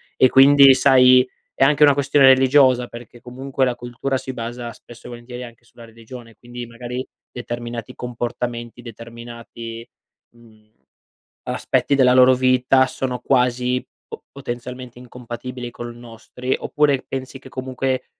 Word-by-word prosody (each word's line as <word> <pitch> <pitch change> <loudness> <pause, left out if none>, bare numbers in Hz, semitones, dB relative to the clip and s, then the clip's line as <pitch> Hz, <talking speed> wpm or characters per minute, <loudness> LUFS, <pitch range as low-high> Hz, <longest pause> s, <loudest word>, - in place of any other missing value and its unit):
E 130 - +4
quindi, 140 +1 +7
sai, 130 -1 +5 0.3
è - - +1
anche 150 +2 +3
una 145 -1 +6
questione 140 0 +3
religiosa, 130 -1 +4
perché 120 0 -12
comunque 130 +2 -3
la 125 -1 -1
cultura 120 +2 -4
si 130 - -7
basa 120 0 -6
spesso 120 0 -15
e - - -10
volentieri 120 +1 -9
anche 120 -1 -14
sulla 120 - -16
religione, 115 +1 -13
quindi 120 +2 -9
magari 120 +2 -7 0.3
determinati 120 -2 -7
comportamenti, 120 0 -5
determinati, 115 0 -10 0.5
mhmm, 110 -2 -23 0.7
aspetti 140 - -1
della 130 -2 +4
loro 130 0 +6
vita 130 +1 +3
sono 130 -1 -4
quasi 125 0 0 0.2
po - - -10
potenzialmente 125 -1 -8
incompatibili 125 0 -8
con 120 0 -8
i - - -15
nostri. 120 +2 -5
Oppure 145 -3 0
pensi 135 0 -6
che 130 - -14
comunque, 130 0 -3
125 Hz, 140 wpm, -20 LUFS, 120-130 Hz, 0.7 s, quindi